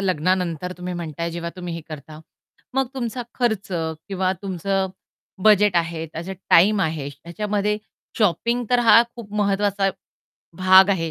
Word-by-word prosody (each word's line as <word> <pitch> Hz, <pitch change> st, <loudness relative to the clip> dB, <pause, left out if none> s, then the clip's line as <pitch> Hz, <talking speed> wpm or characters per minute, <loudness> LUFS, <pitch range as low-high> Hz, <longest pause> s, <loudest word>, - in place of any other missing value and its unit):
लग्नानंतर 180 Hz, -1 st, 0 dB
तुम्ही 180 Hz, 0 st, -5 dB
म्हणताय 170 Hz, -1 st, -4 dB
जेव्हा 170 Hz, 0 st, -5 dB
तुम्ही 175 Hz, -2 st, -5 dB
हे 170 Hz, -, -5 dB
करता, 155 Hz, 0 st, -9 dB, 0.5 s
मग 270 Hz, 0 st, +2 dB
तुमचा 245 Hz, -1 st, -3 dB
खर्च 220 Hz, -5 st, 0 dB
किंवा 175 Hz, +3 st, -2 dB
तुमचं 195 Hz, 0 st, -1 dB, 0.6 s
बजेट 210 Hz, -3 st, +5 dB
आहे 165 Hz, -1 st, -1 dB
त्याचा 165 Hz, +4 st, -6 dB, 0.2 s
टाईम 200 Hz, +4 st, +6 dB
आहे. 160 Hz, -4 st, -1 dB
ह्याच्यामध्ये 205 Hz, +8 st, -2 dB, 0.4 s
शॉपिंग 235 Hz, +4 st, +1 dB
तर 245 Hz, -, +4 dB
हा 230 Hz, 0 st, +7 dB
खूप 215 Hz, -4 st, -10 dB
महत्वाचा 200 Hz, -1 st, +1 dB, 0.7 s
भाग 190 Hz, +1 st, +7 dB
आहे, 165 Hz, -4 st, 0 dB
185 Hz, 135 wpm, -22 LUFS, 170-210 Hz, 0.7 s, हा